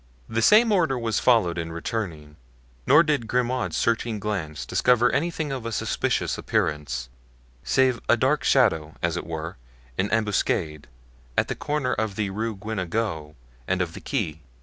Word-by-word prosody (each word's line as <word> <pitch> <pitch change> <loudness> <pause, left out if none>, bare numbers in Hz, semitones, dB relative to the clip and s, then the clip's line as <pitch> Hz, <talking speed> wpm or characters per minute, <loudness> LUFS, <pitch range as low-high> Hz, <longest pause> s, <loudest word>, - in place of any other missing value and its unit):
The 115 +1 -1
same 220 - +6
order 165 -10 +2
was 115 -2 0
followed 100 -9 +3
in 85 0 -4
returning, 85 -4 -4 0.5
nor 150 +4 +7
did 145 -8 0
Grimaud's 125 +1 0
searching 115 -1 0
glance 90 -9 -3
discover 120 -1 +3
anything 155 +1 -1
of 130 -3 -4
a 115 - -4
suspicious - - -1
appearance, 75 -4 -1 0.6
save 130 -2 +2
a 120 - +6
dark 130 +3 +1
shadow, 80 - +2
as 85 0 +1
it 90 - -4
were, 80 0 -5 0.4
in 100 - +1
ambuscade, 95 -8 0 0.5
at - - +2
the - - -2
corner 145 -3 -1
of 110 -2 -2
the 100 -2 -1
Rue 110 +2 -2
Guenegaud 95 -6 -3 0.3
and 95 - 0
of 85 -2 -1
the - - -9
Quai. 85 - -3
110 Hz, 155 wpm, -25 LUFS, 85-125 Hz, 0.6 s, nor